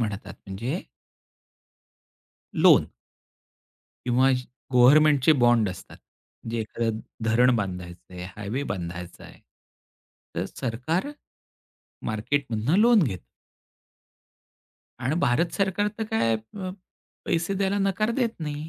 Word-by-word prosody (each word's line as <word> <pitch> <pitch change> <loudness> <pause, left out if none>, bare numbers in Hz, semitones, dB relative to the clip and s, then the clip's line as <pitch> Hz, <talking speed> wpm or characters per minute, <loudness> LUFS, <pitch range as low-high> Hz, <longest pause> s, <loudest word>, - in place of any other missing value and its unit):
म्हणतात, 105 -3 -4
म्हणजे 115 - -3 1.7
लोन. - - +5 1.2
किंवा 130 +2 +4
ज 125 -1 -1 0.3
गव्हर्नमेंटचे 145 +3 +6
बॉन्ड 120 -4 +4
असतात. 90 - -11 0.5
जे 115 - -2
एखादं 110 0 -2 0.3
धरण 120 +3 +4
बांधायचं 90 -3 -5
आहे, 90 0 -6
हायवे 110 +7 -3
बांधायचा 90 -1 -7
आहे. - - -14 0.9
तर - - -1
सरकार 145 - -2 1.0
मार्केटमधून 120 +4 0
लोन 235 -3 +6
घेतं. 95 - -3 1.7
आणि 130 +4 -1
भारत 165 +4 +2
सरकार 200 +1 +1
तर 220 - -1
काय 115 - +2
अ, 185 - -7 0.5
पैसे 175 +3 0
द्यायला 200 +1 0
नकार 195 +3 +1
देत 245 -2 +1
नाही. 150 +1 -4
125 Hz, 105 wpm, -25 LUFS, 110-170 Hz, 1.7 s, गव्हर्नमेंटचे